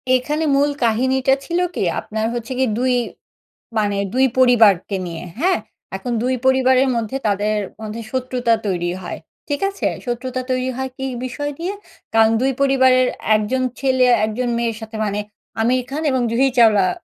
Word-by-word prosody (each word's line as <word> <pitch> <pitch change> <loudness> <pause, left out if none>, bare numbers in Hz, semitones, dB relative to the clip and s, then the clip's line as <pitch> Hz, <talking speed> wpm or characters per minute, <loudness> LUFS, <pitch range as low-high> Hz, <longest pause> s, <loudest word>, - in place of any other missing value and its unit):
এখানে 300 +5 -1
মূল 285 +1 +3
কাহিনীটা 260 +4 +2
ছিল 345 +3 -1 0.2
কি? - - -1 0.2
আপনার 220 0 -3
হচ্ছে 240 +1 -5
কি? 260 - +3
দুই 255 0 +1 0.9
মানে 205 -1 0 0.2
২ 260 +1 +4
পরিবারকে 220 -7 +4
নিয়ে, 165 -1 -6 0.2
হ্যাঁ? 365 +4 +2 0.4
এখন 250 - -4
২ 255 +1 +1
পরিবারের 260 0 +4
মধ্যে 230 +2 -2
তাদের 210 +1 0 0.2
মধ্যে 220 +1 -5
শত্রুতা 250 -2 0
তৈরি 175 -2 -1
হয়। 175 - -6 0.3
ঠিক 285 -1 -2
আছে? 395 - -2 0.2
শত্রুতা 255 +1 -3
তৈরি 255 0 0
হয় 265 0 -3
কী 265 - -4 0.2
বিষয় 290 +3 -4
দিয়ে? 360 +4 -2 0.4
কারণ 225 0 +5
২ 265 +1 +2
পরিবারের 260 -2 +4 0.3
একজন 215 +5 0 0.2
ছেলে 260 -1 +3 0.2
একজন 240 +3 -2
মেয়ের 235 -1 -1
সাথে 220 0 -8
মানে 205 0 -2 0.4
'আমির 250 +3 +2
খান' 305 +4 -3
এবং 260 -1 +1
'জুহি 260 +4 +2
চাওলা' 210 -5 +5
255 Hz, 160 wpm, -20 LUFS, 220-265 Hz, 0.9 s, কারণ